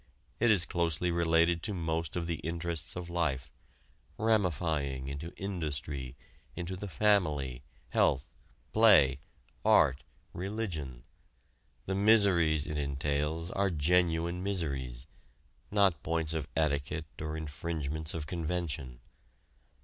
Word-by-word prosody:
It 120 - +4
is 95 -5 +5
closely 85 0 0
related 85 0 +3
to 105 0 -3
most 80 -2 -2
of 85 -1 -1
the 85 -1 -2
interests 85 -1 -3
of 90 -1 -5
life 75 -8 -1 0.7
ramifying 80 -11 0
into 70 +5 -5
industry, 75 -8 -4 0.4
into 90 +1 -4
the 100 +3 -6
family, 75 -10 +1 0.3
health, 65 +2 +2 0.4
play, 75 - +6 0.4
art, 70 +3 +4 0.3
religion. 85 - -4 0.8
The 95 - -2
miseries 95 -7 +4
it 75 -1 -3
entails 75 +4 -1
are 100 0 +1
genuine 85 +1 +1
miseries 70 -10 -2 0.6
not 100 -7 +3
points 80 -1 -1
of 80 -2 -2
etiquette 75 +1 0 0.2
or 80 0 -3
infringements 80 0 -3
of 80 -2 -4
convention. 80 -6 -3
80 Hz, 110 wpm, -31 LUFS, 75-90 Hz, 0.8 s, play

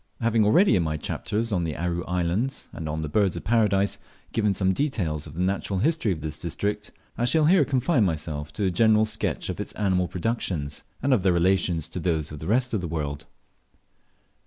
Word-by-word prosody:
Having 115 -2 +2
already, 175 - +5
in 90 - +3
my 80 -1 -1
chapters 110 +8 -3
on 90 -4 +1
the 80 -2 -3
Aru 85 +1 -2
Islands 90 +9 -1
and 80 -1 -5
on 80 +1 -3
the - - -2
Birds 95 +4 +1
of - - -6
Paradise, 105 -3 +2 0.3
given 105 -3 +1
some 95 0 +2
details 90 - -1
of 75 - -11
the 85 - -3
natural 95 +1 -1
history 125 - +1
of 80 -4 -3
this 75 0 -5
district, 105 +5 -3 0.3
I 120 - +2
shall 155 +5 +3
here 175 0 +5
confine 135 -1 +2
myself 75 -4 -2
to 105 - -3
a 95 - +2
general 110 +3 +4
sketch 105 - -2
of - - -4
its - - -5
animal 95 -3 +1
productions, 85 -8 -3 0.2
and 140 - +3
of 120 - +3
their 95 -1 +3
relations 85 -2 +2
to - - -4
those 80 -3 -1
of 75 - -7
the 80 - -6
rest 125 +4 +1
of 105 - 0
the 90 - -3
world. 75 -3 -4
95 Hz, 205 wpm, -25 LUFS, 80-110 Hz, 0.3 s, already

